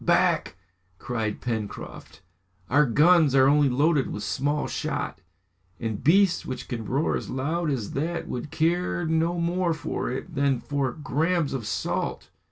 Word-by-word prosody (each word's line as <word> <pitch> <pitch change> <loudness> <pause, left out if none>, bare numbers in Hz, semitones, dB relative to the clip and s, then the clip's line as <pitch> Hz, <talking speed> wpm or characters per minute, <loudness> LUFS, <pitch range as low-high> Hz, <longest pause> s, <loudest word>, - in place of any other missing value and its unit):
"Back!" - - +2 0.4
cried 110 -2 -3
Pencroft. 110 -4 -5 0.5
"Our 145 +2 +5
guns 155 +3 +5
are 130 0 +6
only 145 0 +4
loaded 145 +2 +2
with - - -5
small 145 +2 -1
shot, - - -3 0.6
and 110 -3 -4
beasts 190 +2 +4
which 130 - -6
can 115 -2 -4
roar 140 +7 +1
as - - -4
loud 155 +6 -1
as 125 -8 -2
that 165 +5 -2
would 125 +4 -5
care 175 +2 0
no 160 +2 +1
more 170 0 0
for 155 - -3
it 135 +7 -5
than 140 -3 +1
for 140 0 -1
grams 155 +3 0
of 120 -6 -4
salt!". - - -3
145 Hz, 150 wpm, -26 LUFS, 130-165 Hz, 0.6 s, are